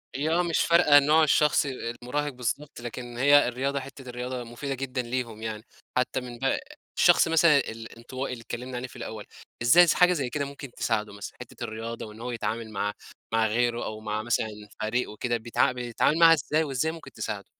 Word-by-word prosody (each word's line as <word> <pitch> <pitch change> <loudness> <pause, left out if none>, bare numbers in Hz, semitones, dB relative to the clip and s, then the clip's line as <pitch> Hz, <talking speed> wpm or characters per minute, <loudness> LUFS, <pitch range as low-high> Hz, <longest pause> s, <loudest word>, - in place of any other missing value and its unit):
هي 145 +4 0
آه 170 +2 +3
مش 170 -2 0
فارقة 170 -4 +6
نوع 155 +3 +4
الشخص 150 0 +3
أ - - -2 0.3
المُراهق 145 +4 -2
بالضبط، 125 +3 -4
لكن 120 0 -7
هي 145 +2 +6
الرياضة 135 +3 -1
حتّة 135 -1 -10
الرياضة 125 +1 -4
مفيدة 120 +4 -5
جدًا 130 -1 -3
ليهم 120 -2 -4
يعني. 110 0 -5 0.3
حتّى 125 +1 0
من 125 -1 -8
ب 135 0 +1 0.4
الشخص - - +5
مثلًا 165 -2 +5
الإنطوائي 115 +2 -5
اللي 120 - -8
اتكلّمنا 125 +2 -6
عليه 125 +1 -4
في - - -16
الأول، 110 -3 -7 0.4
إزاي 170 +10 +7
س - - +4
حاجة 180 0 +5
زي 140 -7 -2
كده 140 +3 -2
ممكن 140 -1 -9
تساعده 105 -3 -1
مثلًا؟ 100 0 -8
حتّة 125 0 -9
الرياضة 115 0 -5
وإن 105 0 -11
هو 125 +1 -4
يتعامل 115 -1 -3
مع 105 0 -2 0.4
مع 110 0 +3
غيره 120 +2 0
أو 110 0 -5
مع 110 0 -3
مثلًا 110 -1 0 0.3
فريق 115 +4 -1
وكده 120 +3 -1
بيتع 115 +2 +1
بيتعامل 125 +4 0
معاها 165 -1 +9
إزاي 155 +1 +1
وإزاي 145 +2 -1
ممكن 165 -1 -11
تساعده؟ - - -5
125 Hz, 195 wpm, -27 LUFS, 115-140 Hz, 0.4 s, معاها